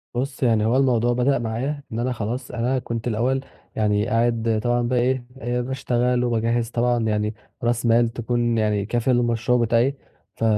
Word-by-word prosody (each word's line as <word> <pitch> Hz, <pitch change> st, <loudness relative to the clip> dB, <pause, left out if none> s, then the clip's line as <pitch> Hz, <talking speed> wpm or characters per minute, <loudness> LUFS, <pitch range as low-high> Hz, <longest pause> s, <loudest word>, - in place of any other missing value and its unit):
بُص 130 Hz, +1 st, -3 dB
يعني 110 Hz, -3 st, +3 dB
هو 120 Hz, +4 st, +2 dB
الموضوع 120 Hz, -3 st, +2 dB
بدأ 125 Hz, +2 st, +2 dB
معايا 130 Hz, +6 st, -3 dB
إن 115 Hz, -, -3 dB
أنا 125 Hz, +1 st, 0 dB
خلاص 120 Hz, +3 st, -4 dB
أنا 125 Hz, +2 st, 0 dB
كنت 115 Hz, -1 st, -4 dB
الأول 120 Hz, +4 st, 0 dB, 0.3 s
يعني 105 Hz, 0 st, +1 dB
قاعد 115 Hz, -1 st, +1 dB
طبعًا 120 Hz, 0 st, +1 dB
بقي 125 Hz, 0 st, +1 dB
إيه 125 Hz, 0 st, 0 dB, 0.2 s
آآ 120 Hz, +1 st, -1 dB
باشتغل 125 Hz, -1 st, 0 dB
وباجهّز 115 Hz, 0 st, 0 dB
طبعًا 120 Hz, -1 st, +1 dB
يعني 105 Hz, 0 st, 0 dB, 0.3 s
رأس 120 Hz, 0 st, 0 dB
مال 115 Hz, 0 st, +4 dB
تكون 120 Hz, 0 st, -1 dB
يعني 105 Hz, -2 st, +1 dB
كافية 120 Hz, +4 st, 0 dB
للمشروع 120 Hz, 0 st, +2 dB
بتاعي، 120 Hz, +3 st, +2 dB, 0.4 s
ف -, -, -5 dB
120 Hz, 170 wpm, -23 LUFS, 115-125 Hz, 0.4 s, مال